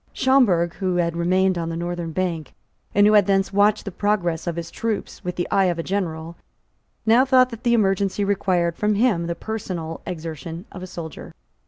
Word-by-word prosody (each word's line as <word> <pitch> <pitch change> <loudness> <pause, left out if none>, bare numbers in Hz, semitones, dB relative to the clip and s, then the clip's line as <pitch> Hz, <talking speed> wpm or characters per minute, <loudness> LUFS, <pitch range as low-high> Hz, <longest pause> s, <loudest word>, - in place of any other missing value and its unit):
Schomberg, 205 -11 +3
who 185 -2 -1
had 170 -1 0
remained 185 +1 +2
on 165 0 -3
the 165 - -4
northern 175 -1 -4
bank, 165 -4 -3 0.4
and 205 0 +6
who 210 - +5
had 210 -1 +5
thence 195 0 +1
watched 205 +1 +3
the 200 - -4
progress 180 -4 -1
of 170 - -1
his 170 0 -6
troops 225 -3 -4
with 180 -1 -4
the 175 - -2
eye 195 -1 +4
of 175 -2 0
a 165 - -3
general, 170 -4 -3 0.7
now 230 +3 +5
thought 255 -1 +4
that 230 -1 -8
the 235 -1 +3
emergency 200 -1 +1
required 180 -4 +1
from 210 +2 +1
him 200 -7 +2
the 170 - -2
personal 180 -6 -5
exertion 165 0 -6
of 185 - -9
a 185 - -6
soldier. 165 -3 -8
185 Hz, 195 wpm, -22 LUFS, 170-205 Hz, 0.7 s, and